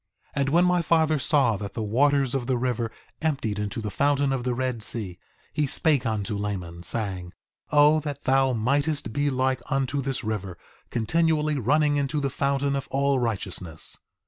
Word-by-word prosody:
2:9 140 - +1
And 135 - +1
when 170 +4 +4
my 180 -1 +3
father 160 -2 +2
saw 130 -6 +2
that 100 0 -7
the 110 - -2
waters 135 +4 +2
of 130 -3 -2
the 130 -2 +1
river 120 -2 -1 0.3
emptied 135 -10 -1
into 105 +2 -3
the 105 -1 -4
fountain 140 +2 +2
of 130 -2 -2
the 125 -1 -1
Red 130 -2 -2
Sea, 100 -5 -4 0.3
he 150 -1 +1
spake 140 -2 +1
unto 105 -1 -2
Laman, 95 -5 -4
saying: 95 -3 -2 0.4
O 150 +1 +5
that 145 -2 -6
thou 135 0 +3
mightest 140 +2 0
be 145 +3 +1
like 130 -1 0
unto 135 -1 0
this 135 -1 -3
river, 100 -5 -3 0.3
continually 155 +4 +1
running 145 +4 +2
into 145 +1 0
the 140 -2 -1
fountain 140 +1 0
of 135 - -3
all 140 0 +1
righteousness! 95 -8 -2
130 Hz, 175 wpm, -25 LUFS, 110-145 Hz, 0.4 s, O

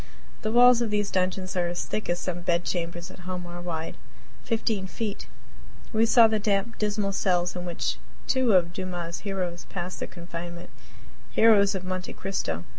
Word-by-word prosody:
The 215 - -1
walls 245 +1 +7
of 235 - 0
these 205 -1 0
dungeons 185 0 0
are 175 -1 +1
as 175 0 -3
thick 215 - -3
as 175 - +2
some 175 -1 -3
bed 170 0 +1
chambers 175 0 -3
at - - -13
home 180 -1 -3
are 175 0 -7
wide 165 -2 -4 0.5
fifteen 220 -4 0
feet. 210 +2 -4 0.7
We 225 +1 +4
saw 230 0 +8
the 220 -1 +1
damp, 200 +2 0
dismal 210 -1 0
cells 180 -2 +1
in 180 0 -4
which 175 -1 -2 0.3
two 260 -4 +3
of 175 -2 +4
Dumas' 175 -2 -4
heroes 185 -4 -3
passed 180 0 -5
their - - -3
confinement 170 0 -8 0.6
heroes 205 -3 +6
of 190 - -3
"Monte 185 0 -4
Cristo." 85 - -3
185 Hz, 175 wpm, -27 LUFS, 175-210 Hz, 0.7 s, saw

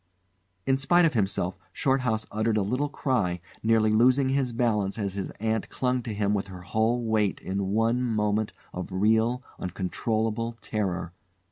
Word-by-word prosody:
In 135 - +3
spite 175 +6 +4
of 160 - +2
himself, 95 -4 0
Shorthouse 130 -5 +1
uttered 110 +1 +1
a 105 - +2
little 130 +8 0
cry, 110 -12 0 0.2
nearly 110 -1 +3
losing 130 +4 +4
his 135 -2 +1
balance 110 -5 0
as 100 -3 -2
his 100 -1 -4
aunt 110 0 -1
clung 125 -1 0
to 115 - -5
him 105 -1 0
with 100 -1 -1
her 90 -2 -9
whole 110 +6 +1
weight 110 -3 +1
in 95 +1 -2
one 115 +4 +2
moment 110 -3 0 0.2
of 90 +1 -5
real, 110 +6 +2 0.2
uncontrollable 110 +5 -2
terror. 95 -6 -2
110 Hz, 155 wpm, -27 LUFS, 100-120 Hz, 0.2 s, spite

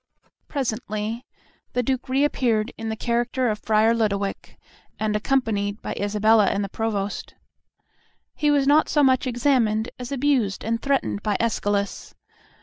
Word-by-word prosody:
Presently 225 -3 -3 0.5
the 250 - +1
Duke 260 +1 -2
re 270 +2 +2
appeared 230 -7 +1
in 225 0 -5
the 220 - -2
character 240 +2 0
of 210 - -4
Friar 220 +1 +3
Lodowick, 205 -3 -2 0.4
and 215 -1 0
accompanied 210 -3 0
by - - -3
Isabella 210 +1 +3
and 200 +1 0
the 200 - -4
Provost. 205 -2 -3 1.0
He 300 - 0
was 285 -2 +3
not 295 +3 +4
so 295 - +3
much 260 -1 +3
examined 240 -3 +1
as 250 +2 -6
abused 260 -8 +1
and 230 +1 -1
threatened 275 -7 0
by 210 -2 0
Escalus. 205 -3 -1
225 Hz, 145 wpm, -24 LUFS, 210-260 Hz, 1.0 s, not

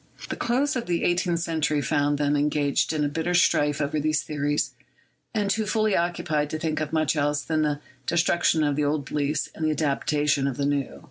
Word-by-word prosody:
The - - -2
close 265 +5 0
of 240 -5 -3
the 170 -1 0
eighteenth 175 -1 +1
century 160 -3 0
found 145 0 +1
them 145 0 +1
engaged 145 -1 +1
in 150 -2 0
bitter 165 +3 -1
strife 150 -4 +3
over 150 +1 -1
these 155 +1 +1
theories, 145 0 -1 0.6
and 210 -3 0
too 215 +1 0
fully 215 -1 +2
occupied 170 -3 0
to 155 - -3
think 155 -1 -2
of 150 - -3
much 160 0 +1
else 145 0 0
than 155 -1 0
the 150 -1 0 0.3
destruction 170 -1 +2
of 145 -1 +1
the 150 - 0
old 145 -1 0
beliefs 145 +1 -1
and 160 - -6
the 155 - +2
adaptation 145 -1 +1
of 135 - -3
the 140 - 0
new. 140 -2 -1
155 Hz, 200 wpm, -25 LUFS, 145-170 Hz, 0.6 s, strife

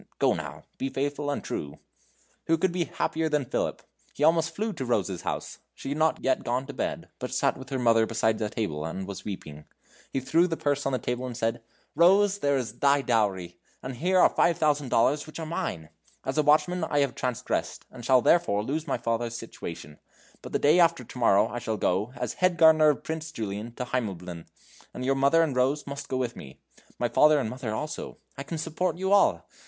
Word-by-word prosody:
Go, - - +3
now; - - -6 0.2
be 135 - -1
faithful 145 +2 -2
and 145 - -2
true!" 70 -1 -5 0.7
Who 165 - +3
could 185 +2 +1
be 175 -1 -1
happier 160 0 -1
than 150 -3 0
Philip! - - -2 0.3
He 145 - -2
almost 165 +1 +3
flew 215 +3 -2
to 135 - -5
Rose's 100 -7 -1
house. - - -4 0.2
She - - -7
had 145 +2 -2
not 160 0 +1
yet 130 - +1
gone 125 +3 -1
to 145 - -8
bed, - - -3
but - - -5
sat - - +1
with 130 0 -10
her 135 - -2
mother 115 -2 +3
beside 110 0 0
a 105 - 0
table, 80 -10 -3
and 95 +4 -5
was 100 -2 -7
weeping. 75 -7 -7 0.5
He 135 - 0
threw 165 +7 +2
the 165 -2 -3
purse 145 -1 0
on - - 0
the - - +2
table 125 +2 -3
and 120 -2 -6
said: 115 -1 -1 0.3
"Rose, 195 +3 +4
there 140 -4 +2
is 120 -3 -5
thy 140 0 +3
dowry! 95 -8 0 0.2
and 130 -1 -6
here 185 +7 +2
are - - +7
five 170 -1 +2
thousand 150 -4 +1
dollars, 140 +7 +2
which 155 - -9
are 165 - -4
mine! 85 - -4 0.4
As 130 - -2
a 155 - +4
watchman 155 +4 +3
I 145 -2 +1
have 140 -3 0
transgressed, 125 -1 -3
and 120 - -11
shall 130 +1 +4
therefore 165 -13 +3
lose 150 +7 -3
my - - 0
father's 115 0 -2
situation; 85 -9 -8 0.4
but - - -9
the - - +1
day 155 +5 +4
after 170 -1 +4
to 125 - -10
morrow 100 -4 +4
I 120 - -5
shall 110 -2 -3
go, 100 +6 0
as 125 - -3
head 185 -1 +1
gardener 160 -1 +7
of 150 - 0
Prince 160 0 -5
Julian, 110 -2 -5
to 125 - -4
Heimleben. 90 -9 -4 0.5
And 125 - -4
you, 135 - +3
mother 140 +5 +4
and 145 -5 -1
Rose, 135 +4 +1
must 140 0 -7
go 130 - -1
with 125 -2 -2
me. 65 -1 -11 0.4
My 120 - 0
father 150 +6 +5
and 120 -6 -1
mother 125 -4 -4
also. 150 +6 -5 0.2
I 140 - -7
can 160 +4 -5
support 165 +3 -2
you 190 +1 -1
all. 195 - +4
135 Hz, 220 wpm, -27 LUFS, 115-155 Hz, 0.7 s, are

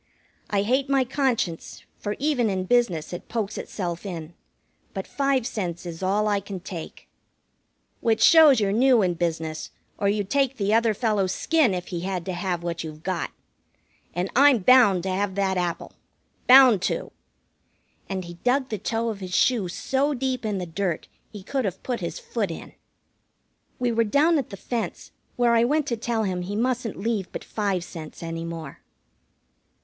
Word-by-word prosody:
"I 200 -1 +1
hate 260 +5 +1
my 275 -1 +3
conscience, 250 - -2 0.2
for 205 0 -3
even 270 -6 +1
in 190 -2 -1
business 185 -7 +1
it 175 - -7
pokes 220 -2 -2
itself 175 -4 -4
in. 170 -4 -6 0.6
But 190 - -3
five 275 -3 0
cents 180 -8 -4
is 170 -1 -7
all 200 +3 +1
I 205 -1 +2
can 195 -1 -7
take." 175 -2 -8 0.9
"Which 220 -1 +2
shows 310 -5 +8
you're 200 -2 +1
new 245 +1 +4
in 180 -1 +1
business, 160 -2 -3 0.3
or 200 - +2
you'd 205 -1 -1
take 275 -2 +1
the 205 0 +1
other 225 -1 +3
fellow's 205 -5 +1
skin 305 - +2
if 180 0 -5
he 175 - -3
had 180 -1 -3
to 185 - -3
have 175 -1 -2
what 170 -1 -3
you've 155 -1 -9
got. 185 -3 -2 0.9
And 180 +2 -2
I'm 280 0 +7
bound 205 -4 +5
to 190 - -2
have 190 0 -1
that 195 -1 +1
apple. 175 -2 -2 0.5
Bound 255 -6 +8
to!" - - -4 1.0
And 190 -2 -3
he 170 - -8
dug 260 +2 +2
the 215 - -3
toe 230 +3 -1
of 215 -3 -5
his 185 -2 -4
shoe 235 -7 +3
so 270 +10 0
deep 255 -1 -2
in 205 -2 -1
the 180 - -3
dirt 175 0 -3 0.2
he 205 -3 -10
could 270 +6 -2
have 190 -1 -4
put 245 -2 -2
his - - -4
foot 470 -2 -3
in. - - -8 1.0
We 245 -1 0
were 230 0 +2
down 295 +8 +3
at 265 - -4
the 195 - -8
fence, 235 +4 -4 0.2
where 240 -1 +3
I 230 0 +4
went 295 +4 +2
to 235 - 0
tell 230 0 -1
him 185 -3 -2
he 195 +3 -4
mustn't 240 -1 -1
leave 210 -2 -2
but - - -6
five 200 -5 -1
cents 165 -2 -9
any 165 0 -4
more. 165 -4 -7
205 Hz, 180 wpm, -25 LUFS, 180-245 Hz, 1.0 s, shows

